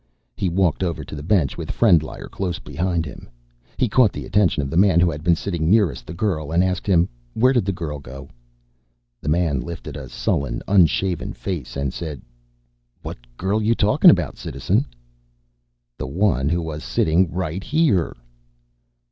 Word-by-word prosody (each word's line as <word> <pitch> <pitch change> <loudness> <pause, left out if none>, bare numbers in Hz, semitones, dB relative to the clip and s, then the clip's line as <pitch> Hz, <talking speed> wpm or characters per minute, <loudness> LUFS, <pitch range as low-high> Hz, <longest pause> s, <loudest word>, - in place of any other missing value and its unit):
He 95 -3 -1
walked 90 -3 +1
over 85 -4 -2
to - - -11
the 75 - -6
bench 85 -2 +1
with - - -6
Frendlyer 85 -9 +2
close 90 -3 -3
behind 85 +3 -2
him. 65 - -10 0.5
He 130 - +2
caught 115 -1 +4
the - - -7
attention 90 -8 +2
of 70 - -4
the - - -3
man 95 -1 +5
who 85 -1 +3
had 75 0 -7
been 85 0 +4
sitting 85 -3 -2
nearest 100 - +2
the - - -6
girl 85 -6 -2
and 85 +2 +3
asked 95 +1 -2
him, 90 -3 +4 0.3
"Where 125 +3 +4
did 120 -7 +2
the 100 - 0
girl 80 -5 -5
go?" 70 +1 -10 0.9
The 75 - -3
man 80 -4 +1
lifted 85 +4 -7
a - - -7
sullen, 70 -4 -2
unshaven 95 -1 +2
face 65 -2 -5
and 70 -2 -2
said, 80 -6 -6 0.8
"What - - -6 0.2
girl 100 +4 0
you 115 +2 +2
talking 105 -1 +5
about, - - +2
Citizen?" - - -1 1.1
"The - - -3
one 75 -3 +1
who 85 +1 0
was 80 -1 -5
sitting 85 +2 +2
right 90 +1 -3
here." 145 - +1
85 Hz, 175 wpm, -22 LUFS, 75-95 Hz, 1.1 s, man